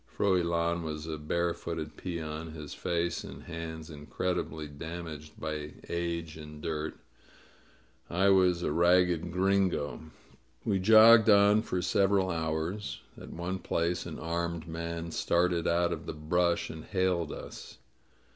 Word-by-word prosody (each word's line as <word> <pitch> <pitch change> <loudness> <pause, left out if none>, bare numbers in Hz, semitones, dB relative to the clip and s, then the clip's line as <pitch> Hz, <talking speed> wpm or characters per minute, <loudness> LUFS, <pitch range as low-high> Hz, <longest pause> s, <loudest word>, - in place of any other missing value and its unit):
Froilan 85 -3 +1
was 75 -1 -5
a 80 -1 -4
barefooted 85 0 -2
peon, 80 -2 -5
his 75 -3 -7
face 85 0 -1
and - - -9
hands 80 -1 -7
incredibly 80 +1 -3
damaged 80 0 -8
by 75 -1 -4
age 85 -2 -3
and 75 -1 -10
dirt; 80 0 -3 1.1
I 95 +4 +3
was 90 -2 +4
a - - 0
ragged 85 +1 +3
Gringo. 95 -4 +2
• - - -8
• - - -13
• 80 - -13 0.6
We 100 -4 +1
jogged 110 +3 +8
on 100 +1 +6
for 90 -5 -2
several 95 0 +2
hours. 80 -1 -2
At - - -10
one 90 +3 -4
place 85 0 -1
an - - -6
armed 85 0 -3
man 85 0 -4
started 85 0 +1
out 85 +1 +2
of - - -7
the - - -3
brush 85 +3 0
and 80 -1 -8
hailed 95 -4 0
us. - - -9
85 Hz, 140 wpm, -30 LUFS, 80-90 Hz, 1.1 s, jogged